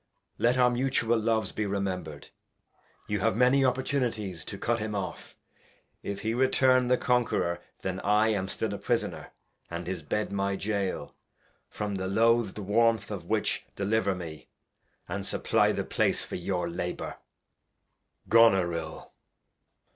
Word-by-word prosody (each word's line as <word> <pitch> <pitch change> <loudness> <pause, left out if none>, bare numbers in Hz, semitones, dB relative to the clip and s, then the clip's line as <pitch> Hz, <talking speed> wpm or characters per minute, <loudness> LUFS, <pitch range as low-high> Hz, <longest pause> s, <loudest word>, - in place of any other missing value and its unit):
Let 120 +2 +3
our 125 -1 +5
Mutual 120 -2 +1
Loves 110 0 +1
be 105 - -2
rememhred, 95 -7 -4 0.7
you 105 0 -1
have 115 +3 +1
many 125 +3 +4
Opportunities 125 - 0
to - - -6
Cut 120 0 0
him 105 -1 -3
off. 95 -2 -5 0.7
If 100 0 -5
he 110 +2 -1
return 130 0 +3
the 125 0 +4
Conqueror, 115 -9 +1 0.2
then 95 0 -2
I 105 +2 +3
am 100 -3 0
still 105 +1 -2
a 100 - -5
Prisoner,' - - -1 0.4
and 85 0 -5
his 90 -1 -4
gke/f 105 +8 -2
Qg^ - - -14
my'^Goal; 100 0 -2 0.6
from 105 -1 -4
the 95 -1 -2
loath' 115 +1 +3
d 105 - -6
Warmth 110 +1 +2
of - - -5
which - - 0
deliver 100 -1 +1
me, 80 -4 -8 0.6
and - - -3
supply - - +2
the - - -2
Place - - +1
for - - -11
your 90 0 -2
Labour. 90 +1 -4 1.1
Goneril. 90 -8 +3
105 Hz, 140 wpm, -28 LUFS, 95-115 Hz, 1.1 s, our